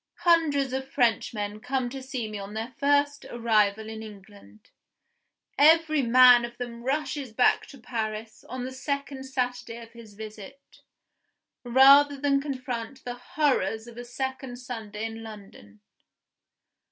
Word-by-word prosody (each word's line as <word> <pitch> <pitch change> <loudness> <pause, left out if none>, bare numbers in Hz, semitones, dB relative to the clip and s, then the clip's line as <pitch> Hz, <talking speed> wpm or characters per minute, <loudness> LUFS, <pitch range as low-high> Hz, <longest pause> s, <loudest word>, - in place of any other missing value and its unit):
Hundreds 295 -6 +3
of 265 0 -3
Frenchmen 215 -4 0
come 255 +2 -2
to 265 +2 -7
see 260 -3 -4
me 210 -1 -6
on 200 +2 -8
their 225 +4 -5
first 285 0 +2
arrival 220 -2 +1
in 220 0 -7
England. 205 0 -14 0.9
Every 310 0 +5
man 250 0 +7
of 235 0 -7
them 240 -1 -6
rushes 275 -1 -2
back 245 +2 +3
to 275 - -13
Paris 220 -2 -5
on 255 0 -5
the 260 - -5
second 275 0 -4
Saturday 250 -3 -3
of 230 -1 -12
his 230 -3 -14
visit, 215 +5 -11 0.8
rather 275 +3 +6
than 275 -1 +2
confront 255 -3 -5
the 245 - -3
horrors 245 -3 -1
of 235 -1 -12
a 240 - -7
second 265 +1 -5
Sunday 225 -4 -6
in 225 0 -6
London! 195 - -12
245 Hz, 140 wpm, -26 LUFS, 220-270 Hz, 0.9 s, man